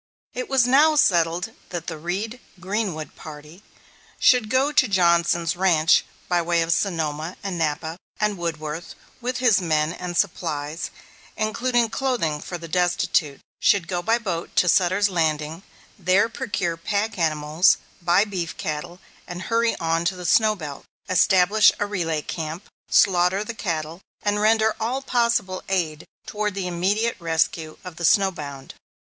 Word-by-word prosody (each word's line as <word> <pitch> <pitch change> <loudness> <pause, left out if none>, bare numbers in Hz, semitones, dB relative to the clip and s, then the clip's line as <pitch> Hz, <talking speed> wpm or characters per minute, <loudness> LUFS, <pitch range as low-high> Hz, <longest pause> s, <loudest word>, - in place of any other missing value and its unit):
It - - -5
was 265 -3 +4
now 295 +5 +5
settled 175 - +2 0.2
that 175 -2 -5
the 165 - -4
"Reed 200 +9 -4 0.2
Greenwood 185 -4 -3
party" 155 +3 -11 0.6
should 245 -5 +4
go 265 +4 +2
to 290 -4 +4
Johnson's 170 -3 +2
ranch 175 -3 +4 0.2
by 175 -1 +2
way 170 0 +1
of 165 +1 +1
Sonoma 160 -3 -2
and 195 -2 -3
Napa, 160 0 -2 0.2
and 210 -1 +1
Woodworth 160 -2 -5 0.3
with 250 +1 -2
his 235 -6 +3
men 155 -2 0
and 175 -1 -5
supplies, 160 -4 -2 0.5
including 235 +1 0
clothing 230 - -1
for 175 - -6
the 170 0 -9
destitute, 175 -4 0 0.2
should 195 -5 +3
go 175 -2 -2
by 225 +5 +2
boat 185 -8 -4
to 180 - +3
Sutter's 185 +3 +3
Landing; 160 -2 -1 0.4
there 190 +4 +3
procure 205 -9 -3
pack 205 +4 -2
animals, 155 +2 +3 0.2
buy 175 +4 +3
beef 180 -5 -4
cattle, 155 +4 -5 0.3
and 175 +1 -6
hurry 230 0 +1
on 165 0 0
to 185 +2 0
the 180 -1 -8
snow 215 +5 +4
belt; 150 -7 -8 0.3
establish 190 +3 +5
a 205 - -1
relay 165 -7 -2
camp, 160 +3 -5 0.2
slaughter 185 +1 +3
the 235 - -6
cattle, 165 -4 -4 0.2
and 205 0 0
render 220 0 +3
all 255 +5 -2
possible 235 -7 0
aid 165 -5 -1 0.2
toward 210 -2 -3
the 195 -2 -3
immediate 195 +6 0
rescue 160 -1 -1
of 180 -3 -9
the 170 - -2
snow 195 +4 +4
bound. 140 -5 -8
180 Hz, 150 wpm, -23 LUFS, 165-210 Hz, 0.6 s, now